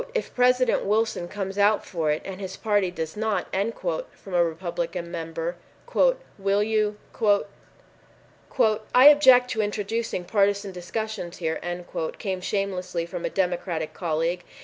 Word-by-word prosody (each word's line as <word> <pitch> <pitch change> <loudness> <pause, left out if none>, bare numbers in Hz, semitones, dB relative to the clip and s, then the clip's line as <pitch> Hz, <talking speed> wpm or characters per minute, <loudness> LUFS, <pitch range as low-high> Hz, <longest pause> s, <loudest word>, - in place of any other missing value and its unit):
"If 480 - -2
President 250 0 +3
Wilson 215 -3 0
comes 195 0 -4
out 205 +1 +3
for 165 -5 -2
it 150 +1 0
and 195 0 -7
his 190 - -6
party 205 -4 +1
does 160 -3 -5
not" 215 0 -2
from 230 - -3
a 175 -1 +5
Republican 170 0 -3
member, 165 0 -4 0.8
"will 200 +1 +2
you——" 215 -1 0 2.0
"I 255 +2 +8
object 260 -4 +7
to 220 - 0
introducing 210 -1 -2
partisan 200 0 +1
discussions 180 0 -5
here," 160 -2 -2 0.6
came 190 -2 -3
shamelessly 185 -3 -2
from 170 0 -5
a - - 0
Democratic 175 -4 -1
colleague. 170 +1 -1
195 Hz, 125 wpm, -25 LUFS, 175-215 Hz, 2.0 s, I